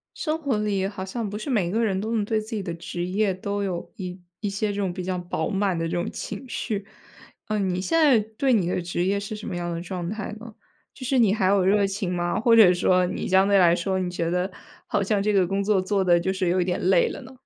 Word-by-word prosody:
生 310 -1 -1
活 280 -8 -1
里 205 -2 0
好 195 -1 -6
像 220 +2 -4
不 205 - -5
是 220 +6 -6
每 195 -9 +1
个 225 +3 +1
人 195 -4 0
都 220 +2 -3
能 215 -2 +1
对 220 +1 0
自 215 - -11
己 205 - -2
的 175 -3 -4
职 175 +1 -5
业 195 +2 +1
都 200 +2 -3
有 180 -3 -4
一 185 -3 -6 0.2
一 205 - -1
些 205 +2 -1
这 - - -6
种 200 -3 -1
比 180 +1 -5
较 185 0 -2
饱 175 -2 -3
满 195 -2 0
的 165 0 -1
这 - - -5
种 175 - -1
情 210 +5 -6
绪。 205 -5 -3 0.6
呃， 215 - -1
你 185 -2 0
现 330 - +1
在 290 -8 +6 0.2
对 265 0 +3
你 195 -7 +2
的 180 - -1
职 175 0 -2
业 200 +2 +1
是 205 +2 -5
什 210 - -8
么 190 - -4
样 175 -1 -3
的 165 - -4
状 175 -1 -4
态 215 0 -5
呢？ 230 0 -10 0.4
就 255 - -9
是 265 +2 +1
你 215 -5 +4
还 200 -3 0
有 195 0 +4
热 200 +1 +3
情 195 -2 -3
吗？ 175 +3 -1
或 230 +1 +4
者 205 -6 +8
说 180 0 +3
你 180 - -3
相 190 +1 +4
对 200 0 +4
来 175 -3 +6
说 190 +2 -1
你 180 -1 -1
觉 170 -2 -2
得 180 +2 -1 0.4
好 205 - 0
像 200 +1 +1
这 210 - +2
个 190 -3 +3
工 195 +2 -1
作 200 -1 +2
做 195 +1 0
得 175 -2 +4
就 190 +3 -1
是 190 -2 0
有 180 +2 +2
一 180 - +1
点 180 0 -1
累 190 +1 +4
了 - - -7
呢？ 260 0 -12
195 Hz, 295 characters per minute, -25 LUFS, 180-210 Hz, 0.6 s, 者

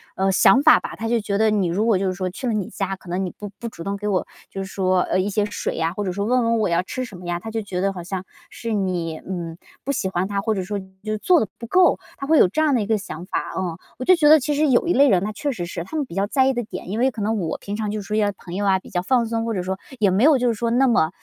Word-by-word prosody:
呃， 195 0 +1
想 260 +8 +5
法 - - +7
吧， - - -7
他 225 0 -4
就 235 -1 +2
觉 200 -1 -2
得 220 0 +3
你 200 -4 +1
如 195 +6 0
果 220 -5 +3
就 195 - -1
是 185 - 0
说 185 0 -3
去 250 +8 -5
了 230 - +1
你 205 -4 -2
家， 195 -1 -3
可 185 -2 -15
能 185 +2 -1
你 - - -3
不 205 -1 -7
不 235 - -5
主 170 -7 -8
动 200 0 -3
给 210 +1 -4
我 190 -3 +1 0.2
就 195 - -5
是 190 - -9
说， 185 -1 +2
呃， 185 - 0
一 195 - 0
些 210 +1 +1
水 205 - -3
呀， 165 0 0
或 205 +1 -3
者 185 - -2
说 200 +2 -2
问 250 +3 +2
问 230 0 +2
我 210 - +1
要 170 +1 +2
吃 255 +7 -5
什 210 -7 -9
么 180 - -11
呀， 175 0 -2
他 225 - -7
就 225 0 -2
觉 185 -3 -4
得 195 - +1
好 180 -3 -7
像 190 0 -4 0.3
是 230 -1 -6
你， 180 -6 -1
嗯， 170 -3 -6 0.3
不 280 - -1
喜 195 - -1
欢 185 +1 -1
他， 200 -1 -1
或 220 +1 0
者 190 - -2
说 205 +2 -3 0.2
就 215 0 -2
做 345 - +4
得 215 - -1
不 235 - -8
够， 365 +7 +4 0.2
他 275 - -5
会 315 +2 +4
有 - - +7
这 310 +12 -1
样 300 -3 +3
的 245 - +3
一 - - -2
个 220 -1 +2
想 180 -4 -7
法， - - -3
嗯。 175 -3 -2 0.2
我 255 - -4
就 370 - +7
觉 305 -3 +4
得 310 +1 +8
其 295 +2 -1
实 295 0 +2
有 255 +6 +3
一 350 - +3
类 280 +1 +5
人 190 -1 +3
他 215 - -3
确 285 +6 -2
实 180 -9 -4
是， 170 -1 -5
他 315 - -6
们 290 - 0
比 175 - -11
较 195 +1 +1
在 260 +4 +3
意 270 - +2
的 240 -1 -2
点， 210 - -8
因 215 +4 -2
为 260 +1 +3
可 220 - -7
能 220 +2 0
我 165 -4 -2
平 200 - -6
常 210 -1 -2
就 210 0 -3
处 205 +1 -6
一 215 - +2
些 205 -1 +2
朋 175 - -10
友 205 - -1
呀 190 -1 +4
比 - - -15
较 180 - 0
放 240 +5 +2
松， 225 0 -2
或 230 - -1
者 180 - -2
说 190 +1 -3 0.2
也 200 -3 +3
没 200 +6 +2
有 300 -2 +6
就 250 0 +1
是 235 - +2
说 230 +1 -2
那 260 +3 +3
么 160 -9 +3
205 Hz, 365 characters per minute, -22 LUFS, 185-235 Hz, 0.3 s, 得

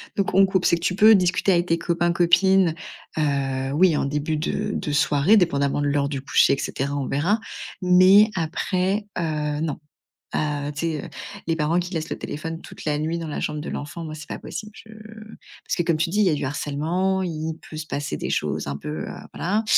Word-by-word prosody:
Donc, 200 -2 0
on 195 +1 +6
coupe 190 -2 0
c'est - - +4
que 170 - -10
tu 180 - +1
peux 215 +3 +7
discuter 185 +1 +2
avec 175 -1 +3
tes 165 - +2
copains, 170 +1 0
copines, 180 0 +4 0.4
heu, 135 -3 0
oui, 170 0 +4
en - - 0
début 150 +2 -1
de 155 - -2
de 150 - -3
soirée, 145 +6 +4
dépendamment 140 -5 +1
de 145 - +1
l'heure 140 0 +1
du 140 -2 -3
coucher, 135 - +4
et - - 0
cetera, 140 +1 -3
on 140 -2 -2
verra. 175 +11 +1 0.4
Mais 185 +4 +6
après, 185 +4 -1
heu, 150 -3 -1
non. 155 -4 -2 0.6
Heu, 145 -1 -1
tu 145 - -10
sais, 160 -3 -2
heu, - - -8 0.4
les 165 - +1
parents 165 +3 +1
qui 180 +1 -6
laissent 160 0 -3
le - - -4
téléphone 165 +2 -5
toute - - -11
la 150 -1 0
nuit 160 +2 -2
dans 165 - -5
la 150 - -4
chambre 150 - -3
de 150 - -6
l'enfant, 150 +3 -6
moi, 155 -1 -6
c'est 155 0 -10
pas - - -5
possible. 215 -1 -7
Je 220 - -15 0.7
parce - - -1
que, 175 - +1
comme 170 -1 +1
tu 165 +2 0
dis, 205 - -1
il 210 - +4
y - - +4
a - - +2
du 145 - -3
harcèlement, 160 +7 -1
il 160 -2 -3
peut 155 - -9
se 155 0 -5
passer 145 -2 -3
des - - -4
choses - - -1
un 70 - -3
peu, 75 +2 -5
heu, - - -7 0.2
voilà. 205 +7 0
160 Hz, 230 wpm, -23 LUFS, 145-180 Hz, 0.7 s, peux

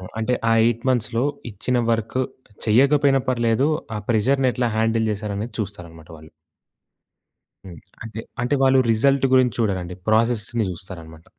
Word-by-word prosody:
ఆ! - - -12 0.2
అంటే 125 +3 0
ఆ - - +5
8 115 0 -1
మంత్స్‌లో 115 0 0 0.3
ఇచ్చిన 125 +5 -1
వర్క్ 115 +2 -1 0.5
చెయ్యకపోయినా 135 +4 +4
పర్లేదు 120 +2 +1 0.3
ఆ - - -3
ప్రెజర్‌ని 130 +4 +2
ఎట్లా 120 -1 -1
హ్యాండిల్ 110 0 +1
చేసారనేది 105 +2 -5
చూస్తారనమాట 85 -6 -7
వాళ్ళు. 80 0 -15 1.4
హ్మ్. 85 -4 -10 0.2
అంటే 115 0 -7 0.2
అంటే 125 +4 +1
వాళ్ళు 135 0 +5
రిజల్ట్ 135 +5 +2
గురించి 130 -3 +3
చూడరండి. 95 -5 -1
ప్రాసెస్‌ని 115 0 +1
చూస్తారనమాట. 80 -3 -11
115 Hz, 130 wpm, -22 LUFS, 100-125 Hz, 1.4 s, ఆ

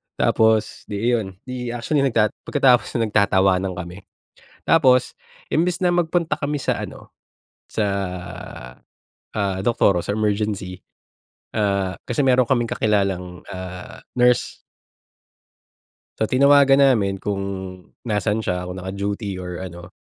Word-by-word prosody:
Tapos, 110 -1 +2
'di 105 - -5 0.2
iyon, 110 -5 0 0.2
'di 125 -2 -5
actually 140 +5 0
nagta 115 -4 +3 0.2
pagkatapos 135 -4 +3
no'n 115 -2 +1
nagtatawanan 95 -2 +2
kami. 90 +1 -7 0.7
Tapos 130 -6 +4 0.4
imbis 180 +3 +1
na 180 - +4
magpunta 175 -1 +1
kami 145 +1 -2
sa - - 0
ano, - - -8 0.6
sa, 110 - 0 1.5
ah, 100 -3 -1
doktor 105 -5 +3
or 85 - 0
sa 100 - -2
emergency, 105 -3 -2 0.7
ah, 100 -3 0
kasi 120 +4 -2
meron 130 -1 +5
kaming 120 -3 +2
kakilalang, 95 -4 -1
ah, 90 -1 -8 0.2
nurse. 125 0 +3 1.6
So, - - 0
tinawagan 140 +3 +5
namin 105 -8 +3
kung 100 -1 -2 0.6
nasaan 105 0 0
siya, 90 -4 -2
kung 90 +1 -6
naka-duty 100 +2 -4
or 90 -1 -6
ano. 90 0 -9
105 Hz, 120 wpm, -22 LUFS, 95-125 Hz, 1.6 s, meron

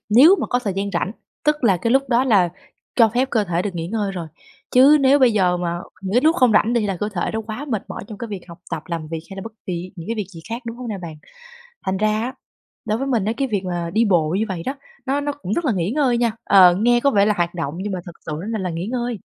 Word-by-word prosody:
nếu 275 - +7
mà - - -1
có 245 - +1
thời 215 -6 -2
gian 200 +1 -1
rảnh, 190 +3 -1 0.3
tức 300 -2 +1
là 195 -5 +4
cái 230 +7 -1
lúc 270 0 +2
đó 245 +1 +3
là 200 -8 +4 0.5
cho 230 -3 +6
phép 250 +5 0
cơ 220 -3 +2
thể 175 -1 -1
được 195 -3 -4
nghỉ 165 -1 -3
ngơi 205 -1 -1
rồi. 175 -3 -5 0.4
Chứ 275 +4 +7
nếu 275 +1 +5
bây 255 -3 +5
giờ 180 -4 +2
mà 175 -1 -2 0.2
những 190 0 -4
cái 245 - +5
lúc 320 +5 +3
không 250 -4 +4
rảnh 225 - +3
đi 235 -3 +1
là 195 -2 -2
cơ 210 - -2
thể 175 - -1
nó 220 - -1
quá 225 +6 -5
mệt 220 -5 -1
mỏi - - -6
trong 210 - -8
cái 235 - -5
việc 200 -3 -5
học 170 0 -11
tập, 165 -3 -3
làm 165 -3 -4
việc 165 0 -4
hay 195 - -8
là 195 - -5
bất 225 +1 -8
kì 180 0 -4
những 165 - -8
cái 230 - -1
việc 210 -4 -3
gì 165 -3 -11
khác, 235 +2 -4
đúng 230 0 -5
không 250 -1 -7
nè 210 -3 -4
bạn? 165 -2 -6 0.7
Thành 190 0 0
ra 215 +1 +1
á, 255 +2 -4 0.5
đối 215 0 -1
với 270 - -2
mình 235 -7 +1
á, 220 - 0
cái 270 +2 -1
việc 200 -4 -1
mà 175 -2 -3
đi 225 +2 +4
bộ 175 -7 +3
như 220 - +1
vậy 180 -4 -4
đó, 265 - -1 0.3
nó 275 +2 +1
nó 290 0 -2
cũng 280 -9 -6
rất 340 - -1
là 265 - +2
nghỉ 185 0 -1
ngơi 260 -4 +2
nha. 235 -2 +2
Ờ, 185 -3 +7
nghe 240 +4 +3
có 280 - +3
vẻ 205 -5 +3
là 210 - +3
hoạt 175 0 -1
động 160 -3 -3
nhưng 200 +2 -3
mà 185 - -3
thực 175 - -8
sự 155 - -3
á 205 - -6
mà 220 - -1
là 185 -2 -2
nghỉ 170 +2 -4
ngơi. 240 -2 -2
210 Hz, 300 wpm, -21 LUFS, 180-245 Hz, 0.7 s, nếu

